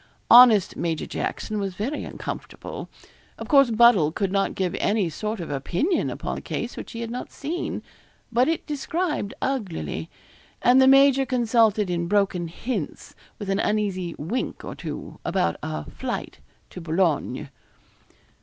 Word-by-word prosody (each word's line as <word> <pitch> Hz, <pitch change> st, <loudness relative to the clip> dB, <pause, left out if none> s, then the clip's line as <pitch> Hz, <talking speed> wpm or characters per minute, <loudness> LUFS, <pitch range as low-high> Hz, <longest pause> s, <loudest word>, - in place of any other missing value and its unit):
Honest 235 Hz, -5 st, +8 dB
Major 165 Hz, -2 st, -2 dB
Jackson 215 Hz, -1 st, -3 dB
was 195 Hz, -2 st, -3 dB
very 250 Hz, +10 st, -3 dB
uncomfortable. -, -, -7 dB, 0.5 s
Of -, -, -7 dB
course, 275 Hz, -4 st, +6 dB
Buddle 220 Hz, -9 st, +5 dB
could 195 Hz, +3 st, -1 dB
not 195 Hz, 0 st, 0 dB
give 185 Hz, -2 st, -1 dB
any 200 Hz, -5 st, +1 dB
sort 215 Hz, +6 st, -4 dB
of 165 Hz, -4 st, -5 dB
opinion 175 Hz, -, 0 dB
upon -, -, -4 dB
a -, -, -12 dB
case -, -, -4 dB
which -, -, -8 dB
he 230 Hz, -, -5 dB
had 230 Hz, 0 st, -4 dB
not 250 Hz, -, -5 dB
seen; 330 Hz, +5 st, -4 dB, 0.5 s
but 245 Hz, +2 st, +3 dB
it 325 Hz, 0 st, -1 dB
described 300 Hz, -, -2 dB
uglily, 200 Hz, -10 st, -3 dB, 0.5 s
and 250 Hz, +2 st, +5 dB
the 265 Hz, -, +6 dB
major 275 Hz, 0 st, +6 dB
consulted 230 Hz, -5 st, +2 dB
in 170 Hz, -1 st, -1 dB
broken 190 Hz, -3 st, +1 dB
hints, 195 Hz, -, -5 dB, 0.2 s
with 205 Hz, -, -6 dB
an 195 Hz, -, +1 dB
uneasy 195 Hz, -5 st, -1 dB
wink 205 Hz, -, -3 dB
or -, -, -5 dB
two, -, -, -7 dB
about 85 Hz, -, 0 dB
a 75 Hz, -1 st, -4 dB
flight -, -, -5 dB, 0.3 s
to 180 Hz, -, -8 dB
Boulogne. 160 Hz, -6 st, 0 dB
210 Hz, 150 wpm, -24 LUFS, 175-250 Hz, 0.5 s, Honest